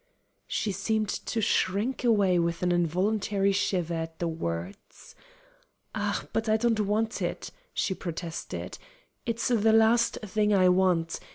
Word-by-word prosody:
She 210 Hz, -, -1 dB
seemed 215 Hz, +2 st, -1 dB
to 225 Hz, -, -2 dB
shrink 205 Hz, +6 st, 0 dB
away 200 Hz, -7 st, +3 dB
with 170 Hz, +1 st, -1 dB
an 180 Hz, -, +2 dB
involuntary 195 Hz, +4 st, +1 dB
shiver 185 Hz, -3 st, 0 dB
at 165 Hz, 0 st, -4 dB
the 170 Hz, -, -2 dB
words. 90 Hz, -, -6 dB, 0.8 s
"Ah, -, -, -2 dB
but 225 Hz, 0 st, -1 dB
I 215 Hz, -, +4 dB
don't 225 Hz, -1 st, +1 dB
want 215 Hz, +2 st, 0 dB
it," -, -, -3 dB, 0.2 s
she 190 Hz, -, -1 dB
protested. 170 Hz, -2 st, -6 dB, 0.5 s
"It's 230 Hz, +1 st, -1 dB
the 225 Hz, -2 st, +3 dB
last 225 Hz, +1 st, +4 dB
thing 210 Hz, 0 st, +1 dB
I 185 Hz, -1 st, +5 dB
want. 180 Hz, -3 st, +2 dB
195 Hz, 135 wpm, -28 LUFS, 175-220 Hz, 0.8 s, I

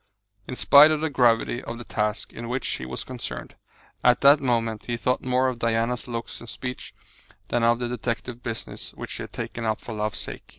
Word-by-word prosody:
In 125 Hz, -, -4 dB
spite 145 Hz, +4 st, +8 dB
of 155 Hz, -1 st, +1 dB
the 160 Hz, -1 st, 0 dB
gravity 120 Hz, -2 st, +3 dB
of 115 Hz, -, -6 dB
the 120 Hz, -, -7 dB
task 105 Hz, -1 st, -2 dB
in 115 Hz, 0 st, -6 dB
which 125 Hz, +1 st, -2 dB
he 65 Hz, -, -3 dB
was 65 Hz, -, -5 dB
concerned, 120 Hz, -, -6 dB, 0.5 s
at 125 Hz, 0 st, +5 dB
that 140 Hz, +1 st, +8 dB
moment 115 Hz, -4 st, 0 dB
he 120 Hz, -1 st, -1 dB
thought 125 Hz, +2 st, 0 dB
more 130 Hz, 0 st, +2 dB
of 125 Hz, -2 st, -2 dB
Diana's 115 Hz, +1 st, 0 dB
looks 115 Hz, -2 st, -5 dB
and 120 Hz, -, -10 dB
speech 125 Hz, 0 st, -6 dB, 0.5 s
than 120 Hz, -1 st, +1 dB
of 115 Hz, 0 st, +4 dB
the 120 Hz, 0 st, -2 dB
detective 120 Hz, 0 st, -4 dB
business 115 Hz, -2 st, -4 dB
which -, -, -7 dB
he -, -, -6 dB
had -, -, -7 dB
taken 115 Hz, -, -5 dB
up 110 Hz, -2 st, 0 dB
for 115 Hz, -, -7 dB
love's 105 Hz, -1 st, -2 dB
sake. -, -, -5 dB
120 Hz, 210 wpm, -25 LUFS, 115-125 Hz, 0.5 s, spite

